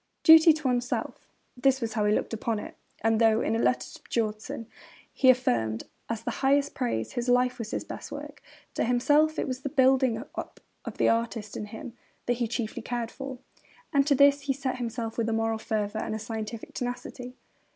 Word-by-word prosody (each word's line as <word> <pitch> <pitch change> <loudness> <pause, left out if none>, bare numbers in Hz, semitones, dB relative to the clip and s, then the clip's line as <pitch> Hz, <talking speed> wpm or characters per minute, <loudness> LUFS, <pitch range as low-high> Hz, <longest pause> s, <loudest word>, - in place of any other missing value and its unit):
Duty 320 +1 +9
to 305 -3 -3
oneself: 245 0 -2 0.3
that 265 +1 +2
was 230 -3 -3
how 215 -1 +1
he 210 - +3
looked - - -2
upon 225 0 -1
it; - - -7 0.3
and 225 0 +2
though, 225 0 +4
in 220 - 0
a - - 0
letter 250 - +1
to - - -11
Björnson, 220 0 -3 0.5
he 260 - +4
affirmed, 115 - +2 0.3
as 230 -1 -3
the - - -2
highest 280 +1 +3
praise, 235 - -2
'his 245 +1 -2
life 250 0 +3
was 225 -2 -4
his - - -3
best - - -8
work,' - - -8 0.3
to - - 0
himself 295 +6 +3
it - - -1
was 255 -1 -3
the 280 - -4
building 260 -3 +3 0.2
up - - -7 0.3
of - - -6
the - - +3
artist 230 -2 -1
in 210 - -4
him 220 +3 -8 0.3
that 245 -1 0
he 240 -1 0
chiefly 230 -1 -3
cared 240 -2 -3
for. 270 -1 -7 0.6
And 280 0 +3
to 285 - +4
this 280 +1 +5
he 280 -1 0
set 260 -1 -3
himself 230 -1 -4
with 230 0 0
a - - 0
moral 225 0 0
fervour 215 -1 -2
and 220 - -3
a - - -2
scientific 220 0 -6
tenacity. 245 0 -5
240 Hz, 205 wpm, -27 LUFS, 225-260 Hz, 0.6 s, Duty